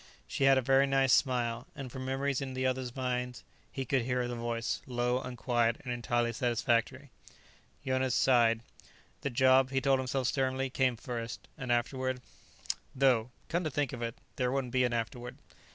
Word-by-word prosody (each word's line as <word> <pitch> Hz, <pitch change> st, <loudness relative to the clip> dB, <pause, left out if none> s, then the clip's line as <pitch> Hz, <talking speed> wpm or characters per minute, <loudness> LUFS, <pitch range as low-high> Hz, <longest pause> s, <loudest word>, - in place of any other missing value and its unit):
She 135 Hz, -, 0 dB
had 135 Hz, 0 st, +6 dB
a 130 Hz, -, +1 dB
very 135 Hz, +2 st, +4 dB
nice 135 Hz, -1 st, +3 dB
smile, 120 Hz, -4 st, +1 dB
and 135 Hz, -4 st, -7 dB
from 130 Hz, +1 st, -6 dB
memories 135 Hz, 0 st, -1 dB
in 130 Hz, -1 st, -4 dB
the 130 Hz, 0 st, -1 dB
others' 130 Hz, -1 st, -1 dB
minds 125 Hz, -2 st, -2 dB, 0.3 s
he 135 Hz, -, -4 dB
could 130 Hz, +1 st, +1 dB
hear 125 Hz, 0 st, -1 dB
her 120 Hz, -, -4 dB
voice, 115 Hz, -1 st, -2 dB
low 125 Hz, 0 st, 0 dB
and 125 Hz, -1 st, -7 dB
quiet 120 Hz, -2 st, +1 dB
and 125 Hz, -2 st, -3 dB
entirely 120 Hz, 0 st, 0 dB
satisfactory. 120 Hz, +3 st, 0 dB, 0.7 s
Jonas 130 Hz, -1 st, +1 dB
sighed. 115 Hz, -3 st, +4 dB, 0.6 s
The 140 Hz, -, -1 dB
job, 130 Hz, +1 st, +4 dB
he 135 Hz, 0 st, +1 dB
told 135 Hz, 0 st, +3 dB
himself 130 Hz, 0 st, -1 dB
sternly, 130 Hz, 0 st, 0 dB
came 130 Hz, -2 st, +1 dB
first. 120 Hz, -2 st, -5 dB
And 125 Hz, -5 st, -4 dB
afterward 130 Hz, +2 st, 0 dB, 0.8 s
Though, 130 Hz, -4 st, +3 dB, 0.2 s
come 170 Hz, +2 st, 0 dB
to 155 Hz, -, -1 dB
think 145 Hz, -2 st, -1 dB
of -, -, -6 dB
it, 115 Hz, 0 st, -3 dB, 0.2 s
there 125 Hz, -1 st, +1 dB
wouldn't 130 Hz, -2 st, -2 dB
be 125 Hz, -1 st, +4 dB
an 120 Hz, -, 0 dB
afterward. 120 Hz, +1 st, -4 dB
125 Hz, 180 wpm, -31 LUFS, 120-135 Hz, 0.8 s, had